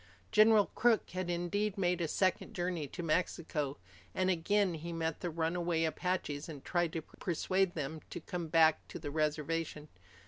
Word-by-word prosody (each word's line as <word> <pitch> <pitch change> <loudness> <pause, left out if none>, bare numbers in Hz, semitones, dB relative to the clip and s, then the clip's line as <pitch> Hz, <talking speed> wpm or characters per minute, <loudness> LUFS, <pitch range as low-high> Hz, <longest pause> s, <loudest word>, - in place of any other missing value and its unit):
General 215 -1 +6
Crook 235 -2 +2
had 185 -1 -3
indeed 185 +4 -1
made 180 -2 +1
a 165 - +1
second 185 +6 0
journey 175 -5 -2
to 175 +6 -6
Mexico, 155 -3 -1 0.4
and 185 0 +2
again 185 +2 +2
he 165 +2 -5
met 165 -2 -2
the 175 - -2
runaway 165 +1 0
Apaches 160 -2 -2
and 145 -4 -9
tried 175 -2 +1
to 165 - -3
persuade 185 +3 -1
them 155 0 -4
to - - -5
come 175 0 -4
back 160 -1 +4
to - - -7
the 145 - -5
reservation. 155 0 -1
170 Hz, 165 wpm, -33 LUFS, 160-185 Hz, 0.4 s, General